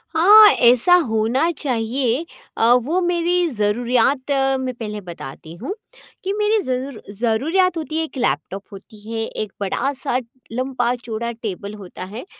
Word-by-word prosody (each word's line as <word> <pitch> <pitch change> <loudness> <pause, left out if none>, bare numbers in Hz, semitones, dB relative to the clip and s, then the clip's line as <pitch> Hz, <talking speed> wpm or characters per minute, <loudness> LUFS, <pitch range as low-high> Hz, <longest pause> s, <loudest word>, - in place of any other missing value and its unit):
हाँ, 420 +6 +9
ऐसा 250 +9 +5
होना 225 +8 +1
चाहिए, 250 +2 -1 0.3
अ, 230 +1 +4
वो 265 +9 +1
मेरी 350 0 +1
ज़रुरयात 245 +4 +1 0.3
मैं 255 -1 -3
पहले 210 -3 -6
बताती 165 -3 -9
हूँ। 255 - -5 0.5
कि 390 +1 -1
मेरी 420 +1 +2
ज़रूर 255 -2 -3
ज़रुरयात 300 - +1
होती 315 0 -4
है 320 - +1
1 310 - -8
लैपटॉप 195 - -2
होती 205 +2 -13
है 225 -1 -2 0.2
1 210 - -9
बड़ा-सा 265 +6 -1 0.3
लम्बा 250 0 -1
चौड़ा 235 -1 -5
टेबल 210 -3 -6
होता 190 -3 -9
है, 235 - -7
245 Hz, 140 wpm, -20 LUFS, 220-315 Hz, 0.5 s, हाँ